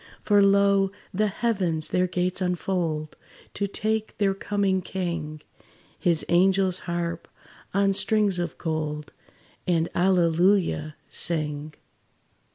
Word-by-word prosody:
For 205 Hz, -1 st, +4 dB
lo! 200 Hz, -1 st, +4 dB, 0.2 s
the 210 Hz, +3 st, +1 dB
heavens 190 Hz, -7 st, 0 dB
their 180 Hz, 0 st, +1 dB
gates 180 Hz, +1 st, -1 dB
unfold 175 Hz, -4 st, -2 dB, 0.4 s
To 200 Hz, -, -1 dB
take 215 Hz, +2 st, -2 dB
their 200 Hz, -2 st, +2 dB
coming 195 Hz, -1 st, 0 dB
King: 170 Hz, -5 st, -4 dB, 0.6 s
His 170 Hz, -4 st, +1 dB
angels 185 Hz, +1 st, +3 dB
harp 170 Hz, -1 st, -3 dB, 0.4 s
on 195 Hz, 0 st, +2 dB
strings 205 Hz, -2 st, +2 dB
of 170 Hz, -2 st, -3 dB
gold, 155 Hz, -2 st, -3 dB, 0.5 s
And 170 Hz, -2 st, +1 dB
"Hallelujah!" 175 Hz, -3 st, +2 dB
sing. 150 Hz, -2 st, -2 dB
180 Hz, 105 wpm, -25 LUFS, 165-195 Hz, 0.6 s, For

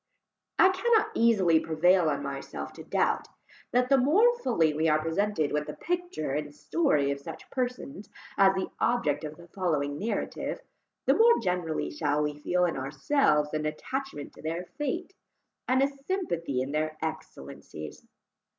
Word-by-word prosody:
I 375 Hz, -, +7 dB
cannot 440 Hz, +3 st, +2 dB
easily 195 Hz, -8 st, +4 dB
prevail 165 Hz, +2 st, +3 dB
on 145 Hz, -, -2 dB
myself 135 Hz, -, -6 dB
to -, -, -10 dB
doubt, -, -, 0 dB, 0.4 s
that 250 Hz, +1 st, +2 dB
the 275 Hz, -1 st, +5 dB
more 410 Hz, -, +4 dB
fully 165 Hz, -, +2 dB
we 160 Hz, +2 st, +1 dB
are 155 Hz, 0 st, +3 dB
presented 165 Hz, 0 st, 0 dB
with 150 Hz, 0 st, -1 dB
the -, -, -6 dB
picture 350 Hz, -, -3 dB
and 145 Hz, +1 st, -3 dB
story 150 Hz, -, +1 dB
of 140 Hz, -, -3 dB
such 140 Hz, -, -9 dB
persons 250 Hz, -3 st, -4 dB, 0.3 s
as 195 Hz, -1 st, +5 dB
the 190 Hz, -, -3 dB
subject 155 Hz, -12 st, +1 dB
of 155 Hz, 0 st, -6 dB
the 170 Hz, 0 st, -14 dB
following 150 Hz, -6 st, -1 dB
narrative, 220 Hz, -, -3 dB, 0.5 s
the -, -, +5 dB
more 470 Hz, +1 st, +6 dB
generally 180 Hz, -3 st, -1 dB
shall 150 Hz, 0 st, 0 dB
we 150 Hz, 0 st, -1 dB
feel 180 Hz, +4 st, +1 dB
in 170 Hz, -, -1 dB
ourselves 150 Hz, -, +1 dB
an 155 Hz, 0 st, -1 dB
attachment 255 Hz, -, -5 dB
to -, -, -14 dB
their 165 Hz, +3 st, -3 dB
fate, 345 Hz, +6 st, -2 dB, 0.5 s
and 260 Hz, +1 st, +3 dB
a -, -, +4 dB, 0.2 s
sympathy 170 Hz, -, -1 dB
in 135 Hz, -, -5 dB
their 155 Hz, +1 st, -1 dB
excellencies. 155 Hz, -, -7 dB
170 Hz, 160 wpm, -28 LUFS, -, 0.5 s, I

